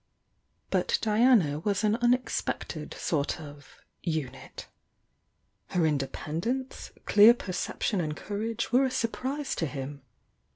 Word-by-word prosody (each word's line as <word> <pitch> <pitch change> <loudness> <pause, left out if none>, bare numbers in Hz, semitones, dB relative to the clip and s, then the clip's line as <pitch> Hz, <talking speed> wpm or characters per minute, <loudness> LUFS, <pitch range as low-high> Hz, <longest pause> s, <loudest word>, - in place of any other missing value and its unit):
But - - +2
Diana 215 - +4
was 200 +4 -1
an 215 0 +3
unexpected 240 -9 -1
sort 150 -2 -1
of 145 -2 -12 0.2
"unit." 150 -6 -4 1.0
Her 175 -3 +1
independence, 160 - -2
clear 215 +3 +8
perception 185 -1 -2
and 155 -2 -3
courage 215 +2 -3
were 255 +2 +5
a - - +1
surprise 260 +4 -2
to 165 - -1
him. 140 0 -6
195 Hz, 110 wpm, -28 LUFS, 150-240 Hz, 1.0 s, clear